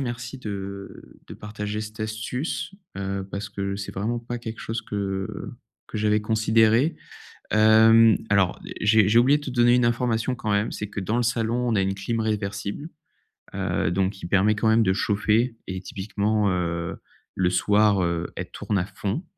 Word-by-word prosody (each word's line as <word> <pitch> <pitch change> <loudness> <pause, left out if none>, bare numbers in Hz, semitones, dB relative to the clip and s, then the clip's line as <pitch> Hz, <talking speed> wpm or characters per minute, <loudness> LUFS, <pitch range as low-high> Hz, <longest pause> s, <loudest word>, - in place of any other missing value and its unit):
merci 120 0 -5
de 100 -3 -7
de - - -9
partager 105 0 -5
cette 110 +1 -9
astuce, 110 - -3 0.2
heu, 95 0 -3
parce 100 +1 -5
que 100 -1 -3
c'est 100 0 -6
vraiment 115 +5 -1
pas 120 +1 -5
quelque 115 -1 -7
chose 115 +1 -3
que 100 -3 -3 0.6
que 110 - -5
j'avais 105 0 +2
considéré. 110 +6 +3 0.6
Hem, 110 +1 +6
alors 100 -3 +2 0.2
j'ai 105 -1 +5
j'ai 115 - +4
oublié 140 +4 +4
te 145 -2 -6
donner 120 -1 +4
une 125 -1 +4
information 120 +1 0
quand 110 -3 -3
même, 105 +2 +1
c'est 105 - -5
que, 105 - -5
dans 105 +5 -1
le 120 - +1
salon, 120 +1 0
on - - +1
a 100 - +3
une 95 0 -1
clim 115 +4 -3
réversible, 105 +5 -3 0.7
heu 80 - -1
donc 95 +2 0
qui 95 - -8
permet, 100 +4 +3
quand 110 - -1
même, 110 +1 +5
de 95 - +3
chauffer 110 +4 +1
et 95 0 -4
typiquement, 100 +2 -1
heu, 85 -2 -2 0.4
le 90 -1 +2
soir, 100 +2 +3
heu, 85 0 -1
elle - - -5
tourne 105 - -2
à 90 - -1
fond. 100 - -4
105 Hz, 175 wpm, -24 LUFS, 100-115 Hz, 0.7 s, Hem